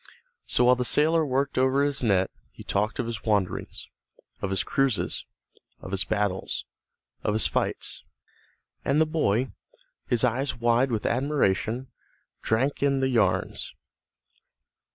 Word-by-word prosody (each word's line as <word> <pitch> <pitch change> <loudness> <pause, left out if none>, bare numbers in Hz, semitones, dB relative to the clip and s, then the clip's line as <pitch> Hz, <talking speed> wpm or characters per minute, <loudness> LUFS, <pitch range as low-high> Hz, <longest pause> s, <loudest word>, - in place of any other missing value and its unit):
So, - - +2
while 125 +1 +6
the 125 - -1
sailor 160 +6 +3
worked 135 -1 0
over 130 +2 +3
his 145 -2 0
net 95 -4 +2 0.2
he - - -12
talked 105 +2 -1
of 125 - -1
his 115 -2 -5
wanderings, 100 -4 -1 0.5
of 100 - -2
his 95 - +1
cruises, 135 -5 0 0.5
of 95 - -9
his 95 -1 0
battles, 100 -2 -1 0.6
of 105 - +1
his 110 - +6
flights, - - -1 0.8
and 140 +2 +2
the 160 - +5
boy, 130 -6 0 0.6
his 120 -1 +1
eyes 130 +3 +1
wide 120 +3 +3
with 110 -2 -2
admiration, 125 -2 0 0.5
drank 130 +6 0
in 140 -1 +2
the 130 0 +1
yarns. 100 -7 0
125 Hz, 135 wpm, -26 LUFS, 105-135 Hz, 0.8 s, while